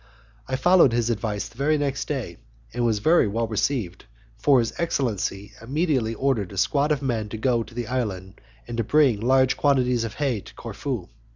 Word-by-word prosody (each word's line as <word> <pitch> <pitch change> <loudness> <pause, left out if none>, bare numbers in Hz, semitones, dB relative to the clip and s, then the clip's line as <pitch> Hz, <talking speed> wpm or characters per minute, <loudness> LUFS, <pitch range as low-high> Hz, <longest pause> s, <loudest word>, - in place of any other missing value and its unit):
I - - -1
followed 175 -2 +5
his 120 0 +1
advice 105 -2 -2
the 115 - -18
very 155 +2 +2
next 140 -2 -2
day, 125 - -4 0.4
and 120 +1 -1
was 115 -2 +2
very 160 +6 +4
well 115 +3 -1
received, 110 -4 -2 0.3
for 140 -2 +3
his 115 -2 0
excellency 110 - -2
immediately 130 -3 0
ordered 115 -9 0
a - - -9
squad 145 +9 +1
of 145 -2 0
men 115 -5 -1
to 110 - -5
go 120 +1 +1
to 115 - -9
the 120 -1 -3
island 105 -6 -4 0.3
and 115 -2 -3
bring 140 -8 +4
large 130 +2 +3
quantities 125 -4 +2
of 115 - -5
hay 135 -7 0
to - - -15
Corfu. - - -5
120 Hz, 185 wpm, -24 LUFS, 110-140 Hz, 0.4 s, followed